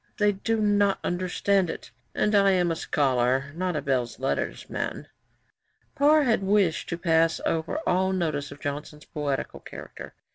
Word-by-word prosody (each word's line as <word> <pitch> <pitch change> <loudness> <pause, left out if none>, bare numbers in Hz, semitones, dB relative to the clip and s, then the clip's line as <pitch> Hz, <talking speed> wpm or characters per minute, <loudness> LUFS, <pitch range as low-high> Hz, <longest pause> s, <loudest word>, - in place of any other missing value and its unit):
They 210 -2 +3
do 220 +3 -1
not 205 -2 +3
understand 185 +1 0
it, - - -7 0.2
and 210 - +1
I 200 -1 +5
am 175 -2 +2
a - - -1
Scholar, 135 -2 0
not 180 +1 -2
a 150 - -2
Belles 125 -3 -1
Lettres 135 +1 -2
man.' - - -4 0.9
Parr 300 +2 +4
had 230 -6 +2
wished 195 -4 +1
to 170 - -2
pass 165 -1 +2
over 160 - -1
all 190 +1 +2
notice 155 -6 -2
of - - -11
Johnson's 150 +1 -6
poetical 145 -3 -3
character. - - -10
175 Hz, 155 wpm, -26 LUFS, 145-200 Hz, 0.9 s, I